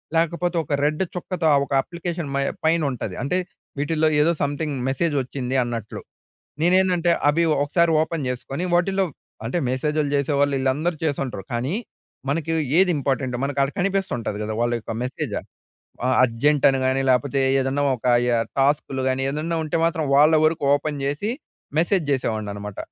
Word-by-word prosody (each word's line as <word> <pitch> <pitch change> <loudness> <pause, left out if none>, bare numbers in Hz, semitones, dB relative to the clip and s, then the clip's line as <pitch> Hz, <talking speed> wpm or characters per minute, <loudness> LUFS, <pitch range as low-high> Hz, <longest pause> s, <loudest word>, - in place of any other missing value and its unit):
లేకపోతే 170 +2 +1
ఒక 145 - -4
రెడ్ 155 +4 +1
చుక్కతో, 180 -1 -3
ఆ - - +6
ఒక 140 - -6
అప్లికేషన్ 170 -3 -5
మై 140 - +1 0.2
పైనుంటది. 140 - 0
అంటే, 160 +7 0 0.4
వీటిలో 155 +2 +1
ఏదో 160 +3 +4
సంథింగ్ 145 +1 -2
మెసేజ్ 150 +4 0
వచ్చింది 130 0 -4
అన్నట్లు. 115 -3 -5 0.6
నేనేందంటే, 180 -1 +3 0.2
అవి 165 +3 +2 0.2
ఒకసారి 170 +3 +2
ఓపెన్ 160 -3 -2
చేసుకుని, 135 +5 -4
వాటిలో 190 +2 +2 0.4
అంటే 120 +9 -1
మెసేజ్‌లు 150 +3 0
చేసేవాళ్ళు 140 0 +1
వీళ్ళందరూ 140 +6 0
చేసుంటారు. 135 -8 -2
కానీ, 125 +9 -1 0.5
మనకి 165 +2 -1 0.2
ఏది 185 0 +5
ఇంపార్టెంటో 130 -2 -1
మనకి 140 0 -2
ఆడ 135 - +2
కనిపిస్తుంటాది 185 - -1
కదా! 110 +1 -3
వాళ్ళ 120 0 +1
యొక్క 115 - -6
మెసేజ. 125 - -4 0.8
ఆహ్, 130 - +2
అర్జెంట్ 135 +5 +1
అని 135 - 0
కానీ, 130 +1 +1
లేపోతే 135 +2 +1 0.2
ఏదన్నా 135 +2 0
ఒక 120 - -7 0.2
యహ్, 115 -1 +2
టాస్క్‌లు 135 -1 +1
కానీ, 130 0 0
ఏదన్నా 155 +4 -2
ఉంటే 155 - -1
మాత్రం 165 -1 0
వాళ్ళ 150 +3 +6
వరకు 155 -2 +1
ఓపెన్ 145 +1 -2
చేసి, 145 +10 -1 0.5
మెసేజ్ 175 +1 +2
చేసేవాడ్ని 110 -6 -2
అనమాట. 105 -1 -7
145 Hz, 150 wpm, -23 LUFS, 130-165 Hz, 0.8 s, ఆ